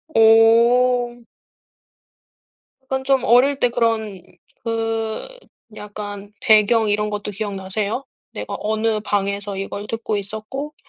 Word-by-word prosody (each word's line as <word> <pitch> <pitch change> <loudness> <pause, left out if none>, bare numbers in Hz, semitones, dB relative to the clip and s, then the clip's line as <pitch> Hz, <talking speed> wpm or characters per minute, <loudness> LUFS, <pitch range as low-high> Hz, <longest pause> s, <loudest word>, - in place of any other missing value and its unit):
오. 240 +2 +4 1.7
그럼 265 0 -2
좀 270 -2 +2
어릴 265 +4 +4
때 245 - +3
그런 220 -5 -1 0.4
그 225 - -2 0.5
약간 205 0 -8
배경 220 0 +4
이런 210 +1 0
것도 210 0 -4
기억 205 0 -4
나세요? 200 +6 -3 0.3
내가 - - -5
어느 220 0 0
방에서 200 -1 -2
이걸 200 +1 -5
듣고 225 -1 -3
있었고 220 +9 -5
220 Hz, 205 characters per minute, -21 LUFS, 205-240 Hz, 1.7 s, 오